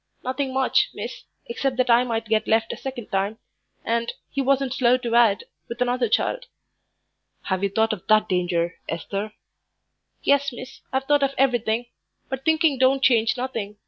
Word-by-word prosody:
"Nothing 260 +1 -2
much, 265 0 +2
miss, - - -7 0.2
except 275 - -2
that 255 -1 +2
I 235 +1 +6
might 230 -2 -2
get 220 0 0
left 225 +1 +2
a - - -5
second 260 -4 -7
time 195 +3 -1 0.5
and, 235 0 0 0.2
he 275 - -1
wasn't 270 -1 +1
slow 250 -1 +3
to 240 -2 -4
add, 230 -4 +4 0.3
with 235 +1 -6
another 245 -1 +1
child." - - 0 1.0
"Have 190 -1 -1
you 200 - +1
thought 220 +3 +1
of 185 - -9
that 215 0 +4
danger, 175 -1 -1
Esther?" 200 +5 -4 0.9
"Yes, 280 0 +3
miss, 255 +1 -10
I've 265 0 0
thought 290 +1 +2
of 275 0 0
everything; 240 -3 +1 0.4
but 265 0 -4
thinking 315 -4 +3
don't 265 +1 +3
change 230 -1 +3
nothing. 225 -5 -4
245 Hz, 170 wpm, -23 LUFS, 220-265 Hz, 1.0 s, I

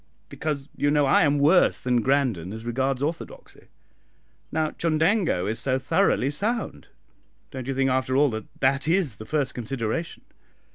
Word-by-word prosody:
"Because, 145 -3 -4
you 145 - +1
know, 145 -1 +3
I 135 - +4
am 145 0 +3
worse 155 +6 +4
than 125 -1 +1
Grandon 125 -10 0
as 110 +1 -8
regards 130 +2 -1
orthodoxy. 170 - -6 0.8
Now, 155 -1 0
Chundango 165 - +1
is 110 +3 -2
so 130 +1 0
thoroughly 130 +1 +1
sound, 200 - -3 0.6
don't 130 -1 -7
you 135 - -2
think, 135 0 +1
after 130 0 0
all, 145 -1 +4
that 110 -1 -5 0.2
that 135 +2 +1
is 165 - +1
the 110 - -9
first 145 +2 -1
consideration?" 125 +5 -4
135 Hz, 155 wpm, -25 LUFS, 125-155 Hz, 0.8 s, I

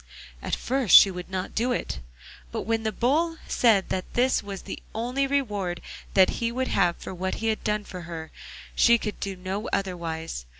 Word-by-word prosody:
At - - -1
first 260 -4 +3
she 195 - +10
would 180 0 -7
not 185 0 -4
do 240 +3 +1
it, 150 - -2 0.5
but - - -3
when 225 0 0
the 220 -1 -1
Bull 315 - +1
said 215 -6 +3
that 185 - -4
this 255 +2 +3
was 200 -2 -7
the - - -7
only 250 +5 0
reward 210 -11 -1 0.4
that 190 -1 +6
he 230 0 +1
would 260 +2 -1
have 175 -3 +2
for - - -7
what 185 +1 -2
he 225 - -1
had 220 - -1
done 210 0 0
for 180 -3 -8
her, 165 -2 -7 0.4
she 235 0 +6
could 210 -2 -5
do 195 -1 -3
no 190 +4 -4
otherwise. 165 - -3
205 Hz, 195 wpm, -26 LUFS, 185-235 Hz, 0.5 s, she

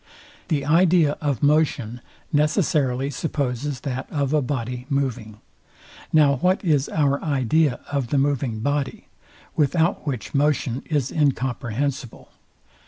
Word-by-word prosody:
The 145 -5 0
idea 165 -1 +4
of 145 -4 -1
motion 140 -6 +1 0.3
necessarily 145 -4 +1
supposes 140 -2 -3
that 130 -2 -4
of 140 -1 -1
a 150 - +3
body 125 -1 -4
moving. 125 -6 -2 0.7
Now 145 -3 +4
what 185 +7 +1
is 145 -5 +2
our 140 -2 +1
idea 140 -1 +1
of 140 -4 -1
the 140 - 0
moving 135 -5 0
body, 145 +1 -2 0.5
without 160 +2 +1
which 125 -6 -4
motion 140 -3 +1
is 145 -5 0
incomprehensible? 135 -2 -2
140 Hz, 115 wpm, -23 LUFS, 125-150 Hz, 0.7 s, idea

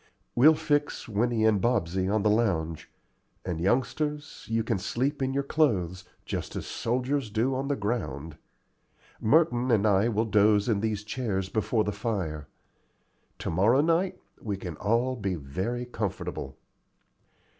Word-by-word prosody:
We'll 150 +6 +6
fix 145 -1 -1
Winnie 115 +1 +1
and 105 -3 +3
Bobsey 95 -6 +1
on 105 -1 +1
the 105 - +4
lounge; 85 -8 0 0.6
and, 85 -3 -3
youngsters, 145 - -1
you 115 0 +1
can 110 -3 -1
sleep 135 +9 -1
in 130 0 +1
your 140 +1 0
clothes, 95 - 0 0.2
just - - -4
as - - -4
soldiers 130 +1 -1
do 115 +5 0
on 135 +1 -2
the 140 - +1
ground. 85 - -3 0.8
Merton 125 -1 +3
and 110 -3 +3
I 100 +1 +4
will 110 0 +1
doze 105 -1 +3
in 110 -4 +2
these 105 -1 -1
chairs 105 -5 -2
before 110 0 +1
the 105 - -1
fire. 95 -8 -3 0.9
To - - -4
morrow 105 - +4
night 170 +4 +1 0.2
we 100 -3 -3
can 90 -4 -6
all 115 +6 +1
be 100 -6 -2
very 95 - -3
comfortable." 100 - -4
110 Hz, 145 wpm, -28 LUFS, 95-125 Hz, 0.9 s, We'll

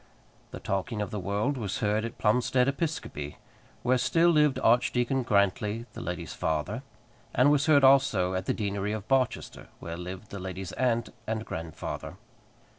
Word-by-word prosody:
The - - -8
talking 100 +3 -2
of 105 +2 -3
the 105 - -3
world 100 +9 -1
was 105 -5 -3
heard 105 -1 +1
at 115 - -7
Plumstead 125 +3 +2
Episcopi, 140 - -3 0.5
where 125 +1 +3
still 165 +7 +3
lived 150 -4 +4
Archdeacon 120 +2 +3
Grantly, 105 +1 +1
the - - -7
lady's 90 -1 -5
father; 80 - -2 0.5
and 130 +4 +5
was 145 0 +2
heard 145 -3 +6
also 130 -9 +5
at 95 +1 -3
the - - +2
deanery 100 -1 -2
of 110 -1 -5
Barchester, 130 -2 0
where 85 0 -6
lived 90 +4 -7
the 100 - -5
lady's 95 0 -5
aunt 120 -3 0 0.2
and 110 0 -2
grandfather. 80 -1 -6
110 Hz, 160 wpm, -28 LUFS, 95-130 Hz, 0.5 s, heard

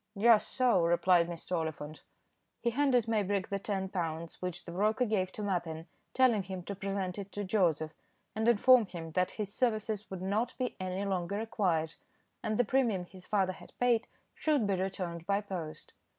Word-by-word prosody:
"Just 225 +1 +5
so," 245 -8 +3
replied 170 0 +4
Mr. 175 +1 -4
Oliphant. 155 -2 -4 0.6
He 235 - 0
handed 250 -3 +2
Maybrick 205 -3 0
the 200 - -1
ten 195 -1 -2
pounds, 165 -3 -4
which 180 -1 -4
the - - -7
broker 215 +7 +2
gave 190 -4 0
to 210 - -5
Mappin, 170 -5 -2 0.3
telling 250 -5 +4
him 185 -1 -6
to 200 - -5
present 195 -1 -3
it 200 0 -7
to 205 - -3
Joseph, 165 -6 +1 0.4
and 220 +1 0
inform 240 0 +6
him 165 -3 -7
that 180 +3 +1
his 205 -2 -3
services 215 -3 -1
would 190 -1 -6
not 210 +5 -1
be 250 -1 -2
any 185 +1 -2
longer 190 0 -1
required, 180 -7 0 0.5
and 215 - -1
the 245 - +3
premium 225 -7 +1
his 185 0 -15
father 190 -3 +1
had - - -15
paid 240 -2 +3 0.3
should 295 -7 +1
be 200 - +1
returned 180 -3 -3
by 200 0 +2
post. 180 -6 -7
195 Hz, 180 wpm, -32 LUFS, 180-220 Hz, 0.6 s, inform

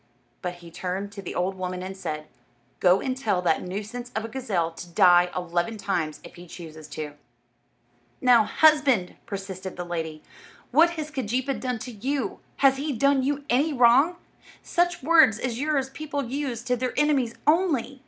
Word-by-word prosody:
But 180 -2 -4
he 170 -1 -13
turned 190 +4 -4
to 200 0 -8
the 185 - -7
old 185 +2 0
woman 185 -1 -4
and 190 +1 -6
said, 155 -5 -5 0.5
"Go 180 +1 +4
and 260 -1 -2
tell 215 -8 0
that 165 -3 +2
nuisance 215 +7 -6
of 220 0 -1
a - - -6
gazelle 205 -10 -1
to 175 +1 -10
die 175 +1 +5
eleven 180 +5 -1
times 170 -7 -2
if - - -12
he 175 +1 -11
chooses 160 -3 -10
to." 150 -1 -6 1.1
"Now, 245 -3 +6
husband," 285 - +3
persisted 190 -2 -6
the 175 - -4
lady, 160 -3 -4 0.5
"what 325 +6 +6
has 305 -1 -4
Keejeepaa 260 0 -2
done 250 -2 -2
to 245 +3 -7
you? 260 +5 -3 0.3
Has 270 0 +6
he 290 +1 -2
done 275 +3 +3
you 280 +2 -1
any 285 +6 +2
wrong? 260 +7 +5 0.5
Such 350 -3 0
words 315 -8 +6
as 240 0 -3
yours 280 -2 0
people 290 -1 -4
use 250 -2 -3
to 250 - +1
their 250 +1 -3
enemies 275 -6 +2
only. 300 -5 +2
230 Hz, 175 wpm, -25 LUFS, 180-275 Hz, 1.1 s, Now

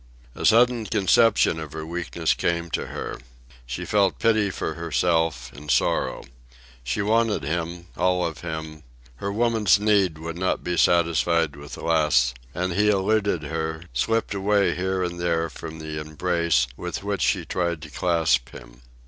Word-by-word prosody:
A - - 0
sudden 120 0 +4
conception 105 -2 +3
of 75 -2 -7
her 80 0 -5
weakness 85 -1 -1
came 85 0 -1
to - - -2
her. - - -6 0.5
She - - -4
felt 100 -2 +2
pity 110 -3 +2
for 80 - -3
herself, 80 -5 0
and 75 +1 -11
sorrow. - - +1 0.6
She 80 +12 -1
wanted 110 -5 +1
him, 85 +3 -3
all 90 0 +1
of 80 -2 -4
him, 80 -2 -6 0.4
her 100 +8 -3
woman's 110 -2 +3
need 100 -6 +2
would 85 +2 -6
not 95 - 0
be 90 - -1
satisfied 85 -2 +2
with 70 0 -9
less; 75 -7 +2 0.2
and 90 0 -1
he 105 +3 +3
eluded 100 -3 +1
her, 80 +1 -3
slipped 115 - 0
away 100 -2 +2
here 95 +1 -1
and 85 -1 -4
there 85 -2 0
from 80 +1 -8
the 80 -1 -5
embrace 80 -3 +1
with 90 +6 -5
which 100 -1 -2
she - - +1
tried 85 -3 -1
to 75 - -10
clasp 80 -8 +1
him. - - -13
85 Hz, 155 wpm, -24 LUFS, 80-100 Hz, 0.6 s, sudden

